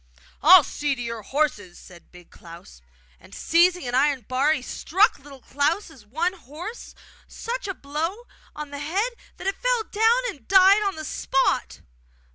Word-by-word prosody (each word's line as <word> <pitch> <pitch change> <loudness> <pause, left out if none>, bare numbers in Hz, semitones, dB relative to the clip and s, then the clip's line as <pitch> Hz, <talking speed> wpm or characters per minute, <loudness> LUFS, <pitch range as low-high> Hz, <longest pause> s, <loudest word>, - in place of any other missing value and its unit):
'I'll 350 +1 +8
see 290 -1 -2
to 245 - -8
your 230 -1 -5
horses!' 210 -8 -2
said 175 -2 -16
Big 180 -1 -17
Klaus; 165 - -14 0.4
and, - - -15
seizing 355 0 +2
an 245 - -4
iron 275 +1 +2
bar, 255 +6 0
he 300 -5 -1
struck 385 - +1
Little 275 -1 -14
Klaus' 290 - -2
one 330 - -1
horse 350 - -10 0.3
such 480 -1 -6
a 390 - -4
blow 325 +11 -4 0.3
on 300 -1 -7
the 285 - -6
head 390 +12 -2 0.2
that - - -10
it 390 - -3
fell - - +1
down 450 +3 +2
and 290 - -8
died 385 +2 +6
on 395 -2 -1
the 315 0 -7
spot. 270 -2 -1
305 Hz, 165 wpm, -24 LUFS, 265-385 Hz, 0.4 s, I'll